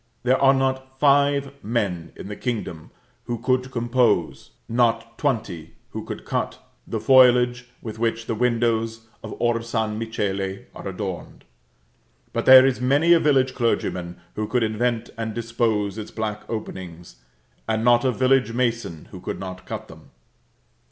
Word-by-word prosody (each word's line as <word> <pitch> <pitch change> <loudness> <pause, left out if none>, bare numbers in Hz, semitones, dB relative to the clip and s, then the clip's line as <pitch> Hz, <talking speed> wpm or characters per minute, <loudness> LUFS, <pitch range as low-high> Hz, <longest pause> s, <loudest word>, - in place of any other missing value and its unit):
There 130 +1 +2
are 135 -1 +7
not 130 0 -1
five 140 -1 +3
men 100 -7 -2
in - - -9
the 105 - -6
kingdom 105 -10 -4 0.4
who 120 -1 -3
could 130 +2 0
compose, 120 -8 +1 0.2
not 115 -1 +1
twenty 105 - -2 0.2
who - - -5
could - - -7
cut, - - -2 0.3
the 110 - -3
foliage 125 0 +5
with 110 -1 -7
which 115 0 -1
the - - -2
windows 115 -1 0 0.2
of - - -6
Or 120 -1 +1
San 110 -2 -2
Michele 100 -4 -3
are - - -8
adorned; 95 -2 -6 0.9
but - - -2
there 130 0 +10
is 130 -2 0
many 145 +7 +4
a 170 - +6
village 135 -4 +2
clergyman 90 -8 -1
who 105 0 -3
could 125 0 +1
invent 115 +1 -1
and 110 -1 -3
dispose 115 -3 -1
its 105 - -7
black 105 -1 -5
openings, 90 - -7 0.5
and 110 0 0
not 120 -1 +5
a 130 - +2
village 130 -1 +2
mason 115 -9 -2
who - - -9
could - - -5
not 95 -1 -8
cut - - -6
them. - - -15
115 Hz, 150 wpm, -23 LUFS, 105-125 Hz, 0.9 s, there